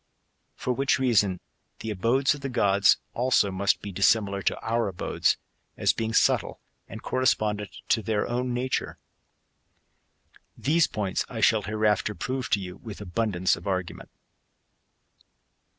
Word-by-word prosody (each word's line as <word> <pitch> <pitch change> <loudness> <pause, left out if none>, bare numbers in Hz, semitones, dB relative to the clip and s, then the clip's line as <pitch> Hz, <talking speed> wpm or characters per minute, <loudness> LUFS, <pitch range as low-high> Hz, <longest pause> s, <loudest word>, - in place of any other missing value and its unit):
For 125 - -2
which 135 +2 +1
reason 105 -8 +2 0.4
the 110 - -4
abodes 120 +8 +2
of 145 - -9
the 135 - -3
gods, 100 -5 +4 0.2
also, 120 -5 +2
must 100 +1 0
be 100 - -5
dissimilar 100 +1 +2
to - - -1
our 115 0 0
abodes, 95 -3 0 0.4
as - - +2
being 110 0 -2
subtle, 115 - +2 0.3
and - - -9
correspondent 110 -5 0 0.2
to 115 - +3
their 105 -1 -1
own 125 +1 -2
nature.^ 125 +2 -2 1.6
These 155 +3 +2
points 100 -3 -2
I 115 - -6
shall 110 0 +4
hereafter 105 0 0
prove 130 +8 -3
to 100 - +2
you 90 -1 -7
with 110 -4 -9
abundance 95 -2 0
of - - -10
argument. 95 -2 -3
110 Hz, 135 wpm, -26 LUFS, 100-125 Hz, 1.6 s, gods